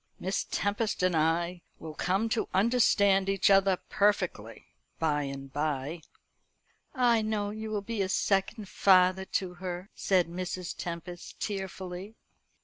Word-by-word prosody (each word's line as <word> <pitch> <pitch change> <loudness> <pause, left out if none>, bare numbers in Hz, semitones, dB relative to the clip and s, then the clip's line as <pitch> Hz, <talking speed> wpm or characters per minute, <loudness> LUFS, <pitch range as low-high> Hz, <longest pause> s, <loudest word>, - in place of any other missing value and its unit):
Miss 190 +2 -2
Tempest 205 -1 -1
and 185 -2 +2
I 170 +3 +1 0.2
will 160 -1 -8
come 190 +7 0
to 225 0 -1
understand 200 -3 +3
each 195 0 +3
other 195 -1 +4
perfectly 205 0 0 0.3
by 150 -2 +1
and 135 0 -7
by." 150 +2 -2 0.9
"I 240 -3 +3
know 215 -1 -1
you 220 +1 -6
will 210 -2 -2
be 225 0 -3
a 190 - -1
second 195 +2 0
father 185 0 +4
to 185 -1 -2
her," 180 +1 -5
said 185 -3 +2
Mrs. 180 +1 -4
Tempest 175 +1 -7
tearfully. 190 0 -5
190 Hz, 135 wpm, -29 LUFS, 175-205 Hz, 0.9 s, other